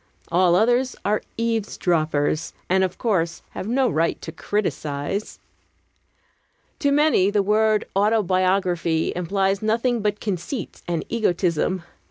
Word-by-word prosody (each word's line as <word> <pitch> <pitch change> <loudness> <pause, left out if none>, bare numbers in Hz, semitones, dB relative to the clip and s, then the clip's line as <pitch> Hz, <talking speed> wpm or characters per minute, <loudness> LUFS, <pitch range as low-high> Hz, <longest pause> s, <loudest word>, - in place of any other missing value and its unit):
All 175 0 +4
others 245 +5 +2
are 210 +1 +1 0.2
eavesdroppers, 170 -10 0
and, 190 +1 +3
of 185 -1 -2
course, 170 -8 -1
have 185 - -6
no 255 +3 +2
right 165 -6 0
to 160 - -6
criticise. 160 0 -3 1.4
To 285 -5 +2
many, 285 -10 +4
the 205 -1 +1
word 215 +1 +2
"autobiography" 185 -5 +1
implies 195 +2 0
nothing 230 +2 +1
but 210 0 -1
conceit 200 - -4
and 170 -2 -2
egotism. 180 -4 0
195 Hz, 115 wpm, -23 LUFS, 175-220 Hz, 1.4 s, All